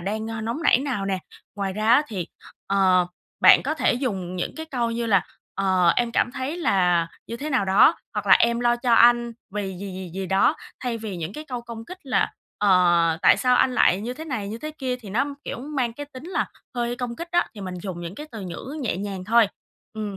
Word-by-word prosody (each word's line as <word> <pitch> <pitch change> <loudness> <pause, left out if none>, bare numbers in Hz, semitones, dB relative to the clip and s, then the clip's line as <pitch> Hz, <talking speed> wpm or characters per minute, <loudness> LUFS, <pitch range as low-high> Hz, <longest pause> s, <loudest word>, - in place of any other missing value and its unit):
đang, 215 +4 -3
ơ, 225 -1 -4
nóng 230 +9 -3
nảy - - +5
nào 260 -8 -2
nè. 190 -1 -1 0.4
Ngoài 195 -2 -2
ra 215 +2 -2
á, 270 +5 +6
thì, 185 -6 -4 0.4
ờ, 185 -2 +3 0.3
bạn - - +8
có 310 - -1
thể - - +2
dùng 195 -8 -3
những 175 - -3
cái 320 0 -6
câu 240 -6 -1
như 230 0 -2
là, 195 -4 +4 0.3
ờ, 185 -2 +2
"Em 240 -1 +1
cảm 245 - +2
thấy 275 +5 -3
là 180 - +2 0.2
như 230 - -5
thế 300 +5 -5
nào 255 -7 +2
đó" 195 +3 +6 0.2
hoặc 205 -1 -3
là - - +6
"Em 235 0 +2
lo 240 0 +3
cho 240 -1 +2
anh 240 0 +5 0.2
vì 210 - -1 0.2
gì, 195 -1 -6
gì, 185 -2 -7
gì 190 -1 -3
đó." 190 +1 +3 0.3
Thay 235 -2 -2
vì 210 -4 -5
những 170 +3 -5
cái 305 +5 -7
câu 245 -4 -5
công 230 -1 -8
kích 365 +6 -10
là, 265 - 0 0.3
ờ, 175 -4 +4
"Tại - - +7
sao 250 -1 +3
anh 260 - +3
lại 190 -5 +4
như 240 +4 -4
thế 315 +3 -8
này, 225 -10 -4
như 225 +2 -5
thế 305 +3 -5
kia", 255 -2 -2
thì 215 -6 -11
nó, 245 +7 +1 0.2
kiểu, - - -5
mang 260 -4 -2
cái 290 +4 -7
tính 260 +3 -10
là - - 0 0.3
hơi 240 0 -2
công 240 -1 -4
kích 340 +1 -6
á, 350 0 +2
thì 205 - -9
mình 185 -1 -5
dùng 185 -4 -5
những 170 +2 -6
cái 300 +5 -8
từ 220 - -7
ngữ 195 - -7
nhẹ 215 - -1
nhàng 195 -2 -5
thôi. 225 0 +4 0.4
Ừm, 210 -3 -5
225 Hz, 240 wpm, -24 LUFS, 195-250 Hz, 0.4 s, bạn